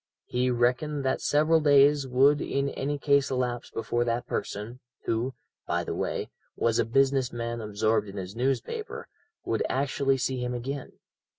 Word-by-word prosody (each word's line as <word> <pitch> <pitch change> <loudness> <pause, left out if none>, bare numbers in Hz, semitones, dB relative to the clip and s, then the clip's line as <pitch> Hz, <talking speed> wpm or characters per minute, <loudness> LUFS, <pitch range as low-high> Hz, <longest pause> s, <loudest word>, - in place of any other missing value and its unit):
He 125 +1 0
reckoned 125 +4 +1
that 130 - 0
several 155 +2 +3
days 145 -1 +5
would 135 +3 +4
in 140 0 -1
any 145 +2 -2
case 140 -1 +3
elapse 125 -2 -2
before 115 +2 -1
that 120 0 -1
person, 110 +5 -4 0.3
who, 120 +4 -1 0.3
by - - 0
the - - -4
way, - - -3 0.2
was 115 -1 +1
a - - +3
business 135 +1 +2
man 115 0 -4
absorbed 105 0 0
in 100 - -9
his 95 +1 -6
newspaper, 135 - -2 0.4
would 115 - 0
actually 135 0 +1
see 130 0 -1
him 125 0 -2
again. 135 +3 -5
130 Hz, 160 wpm, -27 LUFS, 120-140 Hz, 0.4 s, days